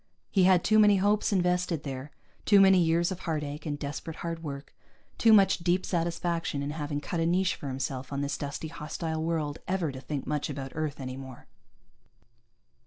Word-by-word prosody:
He 190 Hz, -3 st, +4 dB
had 185 Hz, -2 st, +5 dB
too 215 Hz, 0 st, +4 dB
many 205 Hz, -1 st, +6 dB
hopes 205 Hz, +3 st, +2 dB
invested 180 Hz, -4 st, +1 dB
there, 135 Hz, 0 st, -5 dB, 0.3 s
too 205 Hz, -1 st, +6 dB
many 190 Hz, -1 st, +7 dB
years 170 Hz, +1 st, +2 dB
of 185 Hz, -, -4 dB
heartache 150 Hz, -2 st, -4 dB
and 145 Hz, -1 st, -2 dB
desperate 145 Hz, +3 st, -5 dB
hard 165 Hz, -1 st, -3 dB
work, 140 Hz, -3 st, -7 dB, 0.5 s
too 225 Hz, -, +5 dB
much 200 Hz, -4 st, +6 dB
deep 175 Hz, +2 st, +1 dB
satisfaction 170 Hz, -3 st, -1 dB
in 145 Hz, -, -3 dB
having 150 Hz, -1 st, -3 dB
cut 170 Hz, -, -3 dB
a 165 Hz, -, +1 dB
niche 185 Hz, +2 st, +2 dB
for 145 Hz, -, -8 dB
himself 130 Hz, 0 st, -4 dB
on 140 Hz, 0 st, -2 dB
this 140 Hz, 0 st, -1 dB
dusty, 145 Hz, +2 st, -5 dB
hostile 160 Hz, 0 st, -4 dB
world, 160 Hz, -2 st, -2 dB
ever 185 Hz, -5 st, 0 dB
to 130 Hz, -1 st, -8 dB
think 140 Hz, +1 st, -4 dB
much 150 Hz, -1 st, -2 dB
about 135 Hz, -2 st, -5 dB
Earth 155 Hz, -2 st, -3 dB
any 130 Hz, -1 st, -5 dB
more. 130 Hz, -2 st, -10 dB
160 Hz, 185 wpm, -28 LUFS, 145-180 Hz, 0.5 s, many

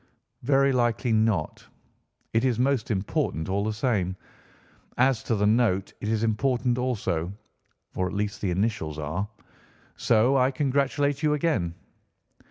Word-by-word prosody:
"Very 135 Hz, +1 st, +3 dB
likely 120 Hz, -1 st, +1 dB
not. 110 Hz, -7 st, 0 dB, 0.7 s
It 115 Hz, +1 st, +2 dB
is 125 Hz, -4 st, +1 dB
most 130 Hz, -2 st, +1 dB
important, 95 Hz, -, -1 dB
all 100 Hz, +1 st, 0 dB
the 110 Hz, -, -1 dB
same. 105 Hz, -5 st, 0 dB, 0.8 s
As 130 Hz, -2 st, +3 dB
to 115 Hz, -, +1 dB
the 105 Hz, 0 st, +1 dB
note, 105 Hz, -3 st, +2 dB
it -, -, -3 dB
is 110 Hz, 0 st, 0 dB
important 125 Hz, +2 st, +1 dB
also, 100 Hz, -9 st, -1 dB, 0.6 s
or 95 Hz, -, 0 dB
at 95 Hz, -, -6 dB
least 105 Hz, +1 st, -3 dB
the 100 Hz, -, 0 dB
initials 90 Hz, -5 st, -1 dB
are, 75 Hz, +7 st, -3 dB, 0.7 s
so 120 Hz, +4 st, +3 dB
I 130 Hz, 0 st, +4 dB
congratulate 140 Hz, +1 st, 0 dB
you 150 Hz, -1 st, +2 dB
again." 140 Hz, -, 0 dB
115 Hz, 140 wpm, -26 LUFS, 100-130 Hz, 0.8 s, I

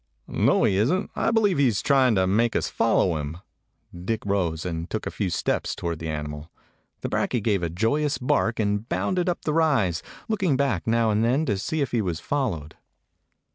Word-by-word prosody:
"No, -, -, +2 dB
he 95 Hz, -, +3 dB
is 110 Hz, +8 st, +3 dB
n't. 185 Hz, +2 st, -1 dB
I -, -, +1 dB
believe 210 Hz, -7 st, +2 dB
he 135 Hz, -3 st, +5 dB
's 105 Hz, -, -2 dB
trying 130 Hz, -5 st, +4 dB
to 95 Hz, -1 st, +3 dB
make 110 Hz, +5 st, +1 dB
us -, -, 0 dB
follow 95 Hz, -7 st, +2 dB
him." 75 Hz, +2 st, -5 dB, 0.6 s
Dick 100 Hz, +6 st, -4 dB
rose 90 Hz, -5 st, -1 dB
and 85 Hz, -1 st, -4 dB
took 110 Hz, -, -3 dB
a -, -, -3 dB
few 100 Hz, -4 st, -2 dB
steps 85 Hz, -, -1 dB
toward 85 Hz, -2 st, -4 dB
the 80 Hz, -, -4 dB
animal. 75 Hz, 0 st, -5 dB, 0.5 s
The -, -, -2 dB
brakje 120 Hz, -4 st, -1 dB
gave 105 Hz, -4 st, +1 dB
a 85 Hz, -, -1 dB
joyous 130 Hz, -, 0 dB
bark 125 Hz, -3 st, 0 dB
and 105 Hz, +1 st, -1 dB
bounded 180 Hz, -1 st, 0 dB
up 175 Hz, -, -3 dB
the 150 Hz, -, -1 dB
rise, 135 Hz, -, +2 dB, 0.3 s
looking 190 Hz, -10 st, +1 dB
back 130 Hz, -11 st, 0 dB
now 115 Hz, -1 st, +2 dB
and 105 Hz, +1 st, +1 dB
then 130 Hz, +7 st, +2 dB
to 105 Hz, -, 0 dB
see 155 Hz, +11 st, -2 dB
if 140 Hz, -, -1 dB
he 120 Hz, -, +1 dB
was 85 Hz, -5 st, -2 dB
followed. 105 Hz, -, -2 dB
110 Hz, 205 wpm, -25 LUFS, 90-140 Hz, 0.6 s, he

